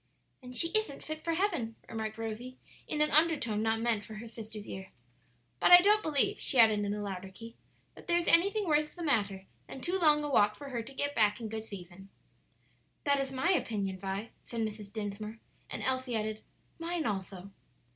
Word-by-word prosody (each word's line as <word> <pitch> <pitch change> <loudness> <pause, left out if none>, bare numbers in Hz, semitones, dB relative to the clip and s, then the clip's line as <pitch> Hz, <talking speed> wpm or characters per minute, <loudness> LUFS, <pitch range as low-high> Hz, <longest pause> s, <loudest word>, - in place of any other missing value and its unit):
"Then 250 -1 -10
she 335 +7 +2
isn't 435 -8 -1
fit 310 0 -6
for 335 -1 0
heaven," 325 - 0
remarked 220 -1 -4
Rosie 225 +3 -5 0.3
in 300 - -1
an 300 - +3
undertone 295 -9 +3
not 225 0 +1
meant 230 -3 +1
for 220 - -9
her 215 +2 -7
sister's 220 -2 -8
ear; 190 0 -7 0.7
"but - - +4
I 355 - +12
don't 415 +3 +4
believe," 300 -7 +1
she 265 - +2
added 220 -3 +7
in 205 0 -1
a 210 - -4
louder 195 -1 -5
key, 230 +4 -11 0.4
"that - - -15
there 345 0 +3
is 345 - -1
anything 400 +4 +4
worse 300 -1 +1
the 350 - -6
matter 200 -10 0 0.2
than - - -8
too 355 +7 -1
long 300 -3 +5
a 295 - -2
walk 210 -4 +4
for 285 -1 -9
her 240 -3 -2
to 265 +4 -10
get 285 +1 -1
back 210 -4 +3
in 225 -2 -5
good 220 0 -5
season." 190 -1 -10 0.9
"That 280 -1 +2
is 270 -1 -2
my 270 +7 +1
opinion, 200 - -1
Vi," 195 +3 -4
said 230 -1 -4
Mrs. 215 -2 -4
Dinsmore; 215 +1 -5 0.3
and - - -4
Elsie 260 -2 -1
added, 215 0 -2 0.4
"Mine 335 -1 -2
also." 195 -2 -4
230 Hz, 200 wpm, -31 LUFS, 210-300 Hz, 0.9 s, I